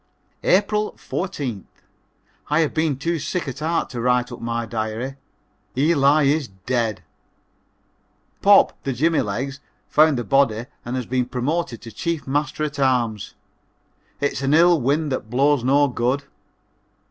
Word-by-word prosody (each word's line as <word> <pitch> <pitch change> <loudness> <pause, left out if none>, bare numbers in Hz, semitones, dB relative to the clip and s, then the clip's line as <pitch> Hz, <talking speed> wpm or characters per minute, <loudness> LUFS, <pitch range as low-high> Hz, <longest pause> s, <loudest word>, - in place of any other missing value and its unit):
April 210 +2 +2
14th. 140 - -4 0.8
I 150 +2 +3
have 155 - 0
been 160 -4 0
too 165 +4 -1
sick 170 +3 -3
at 135 - -5
heart 165 +2 -1
to 120 - -4
write 125 0 +1
up 120 - -8
my 115 0 -2
diary 115 +4 -4 0.6
Eli 145 0 +4
is 140 0 +2
dead! 110 +3 -2 1.4
"Pop," - - +5
the 135 - -2
Jimmy 160 +6 +2
legs, 130 +7 -3 0.3
found 155 -2 +4
the 120 - -2
body 120 -2 +2 0.2
and 120 +2 -4
has 130 -2 -2
been 125 0 -1
promoted 130 +1 -2
to 115 - -9
Chief 170 +2 -3
Master 145 +2 -1
at 150 -1 -3
arms. 120 -6 0 0.8
It's 145 -2 -1
an 140 +2 +2
ill 170 -1 +5
wind 145 +4 0
that 120 -4 -3
blows 140 +2 +2
no 140 +3 +4
good. 125 +2 -1
135 Hz, 145 wpm, -22 LUFS, 120-155 Hz, 1.4 s, Pop